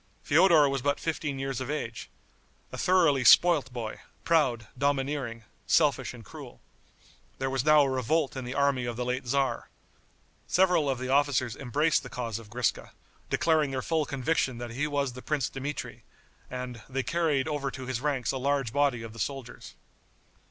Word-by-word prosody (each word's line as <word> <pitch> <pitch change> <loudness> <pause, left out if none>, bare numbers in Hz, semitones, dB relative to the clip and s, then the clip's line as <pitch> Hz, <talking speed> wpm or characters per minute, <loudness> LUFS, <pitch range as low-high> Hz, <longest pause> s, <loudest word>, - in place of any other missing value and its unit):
Feodor 160 -1 +5
was 135 -1 -1
but 145 +2 0
fifteen 155 -3 -3
years 135 -1 -3
of 130 - -5
age, 115 -7 -4 0.6
a - - -7
thoroughly 165 -8 +3
spoilt 150 +1 +6
boy, 115 -3 -5 0.2
proud, 135 -9 +2
domineering, 135 -3 -1 0.2
selfish - - +2
and - - -12
cruel. - - -11 0.8
There 135 0 -2
was 135 -1 0
now 150 0 +6
a 135 - 0
revolt 135 +4 0
in 130 - -4
the 125 +2 -6
army 140 -3 +1
of 120 -1 -3
the 125 +1 -3
late 125 +1 -2
tzar. 135 +2 -1 0.8
Several 180 -6 +3
of 135 - 0
the 130 +1 -5
officers 135 -4 +2
embraced 145 +5 +1
the 125 - -10
cause 115 -3 -4
of 110 -2 -13
Griska, 120 0 -2 0.4
declaring 155 -3 +2
their 130 -1 -3
full 160 -2 0
conviction 135 -2 -1
that 120 0 -6
he 140 +6 -1
was 140 -3 -1
the 125 - -9
Prince 145 -3 -1
Dmitri, 140 +2 -6 0.5
and, 125 -2 -6
they 135 0 -2
carried 160 -5 0
over 145 -3 -2
to 130 -1 -8
his 125 -2 -3
ranks 140 -4 0
a 135 - -3
large 135 -3 0
body 140 -5 +1
of 115 -1 -8
the 115 - -11
soldiers. 130 +2 -6
135 Hz, 175 wpm, -28 LUFS, 125-145 Hz, 0.8 s, spoilt